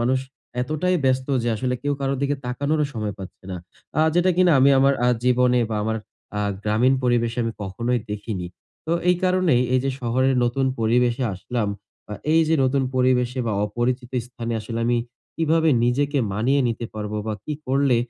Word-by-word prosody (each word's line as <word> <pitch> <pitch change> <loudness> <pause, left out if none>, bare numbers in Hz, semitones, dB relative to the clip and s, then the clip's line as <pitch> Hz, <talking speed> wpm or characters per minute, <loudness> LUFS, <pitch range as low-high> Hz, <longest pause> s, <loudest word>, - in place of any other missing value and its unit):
মানুষ 130 +2 +2 0.4
এতটাই 155 +7 0
ব্যস্ত 130 0 +2 0.2
যে 120 - -1
আসলে 125 +3 -1
কেউ 145 0 0
কারো 135 0 0
দিকে 140 +1 +1
তাকানোরও 145 +5 0
সময় 105 -3 -3
পাচ্ছে 95 0 -10
না। 90 - -4 0.4
আ - - +5
যেটা 175 +1 +4
কিনা 180 -2 +5
আমি 140 +2 +6
আমার 140 +1 +4
আ - - +4 0.2
জীবনে 125 0 +3
বা 110 - -1
আমার 110 +1 -1 0.4
আ - - 0 0.2
গ্রামীণ 115 +5 +3
পরিবেশে 120 -1 +1
আমি 115 - -2
কখনোই 115 +6 -1
দেখিনি। 105 -3 -4 0.4
তো 165 - 0 0.2
এই 180 - +5
কারণেই 180 -9 +3
এই 130 - +4
যে 135 - +1
শহরের 130 +2 +1
নতুন 130 +3 0
পরিবেশে 120 +2 +2
আসলাম 110 +2 -2 0.4
বা 105 - -6 0.2
এই 165 - +5
যে 160 - +3
নতুন 135 +1 +2
পরিবেশে 125 0 +2
বা 110 - 0
অপরিচিত 120 +3 -2
স্থানে 120 -1 -5
আসলে 115 +2 -5
আমি 120 0 +2 0.4
কিভাবে 160 0 +2 0.2
নিজেকে 140 +4 +1
মানিয়ে 125 +8 +2
নিতে 115 0 -3
পারবো 105 0 -4
বা 110 - -1
কি 150 - -3
করলে 135 -1 +3
125 Hz, 180 wpm, -23 LUFS, 115-140 Hz, 0.4 s, আমি